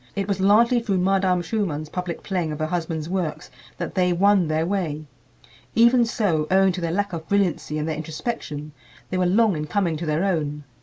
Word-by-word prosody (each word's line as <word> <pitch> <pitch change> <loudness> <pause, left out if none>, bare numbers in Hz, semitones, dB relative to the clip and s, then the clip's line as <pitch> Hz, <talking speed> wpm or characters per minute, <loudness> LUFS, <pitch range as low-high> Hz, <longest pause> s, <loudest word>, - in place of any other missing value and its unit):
It 195 -1 -2
was 200 -2 -1
largely 230 +5 +5
through 210 -5 -1
Madame 185 -1 +2
Schumann's 165 -6 -2
public 180 +1 -5
playing 175 -5 -2
of 150 - -4
her 155 - -1
husband's 160 -2 -3
works 165 -6 -3 0.3
that - - -4
they 180 -1 +2
won 195 0 +3
their 155 +1 0
way. 165 -5 -2 0.7
Even 235 +1 +5
so, 185 -10 0
owing 190 0 +4
to 180 0 -5
their 170 - -1
lack 200 +1 -1
of 160 -1 -5
brilliancy 185 -6 0
and 155 +1 -2
their 160 - -2
introspection, 155 -2 -5 0.4
they 185 - 0
were 180 - +2
long 210 +1 +3
in 150 0 -4
coming 170 -2 0
to 165 +1 -5
their 155 +3 +1
own. 150 -6 -1
180 Hz, 200 wpm, -23 LUFS, 155-200 Hz, 0.7 s, largely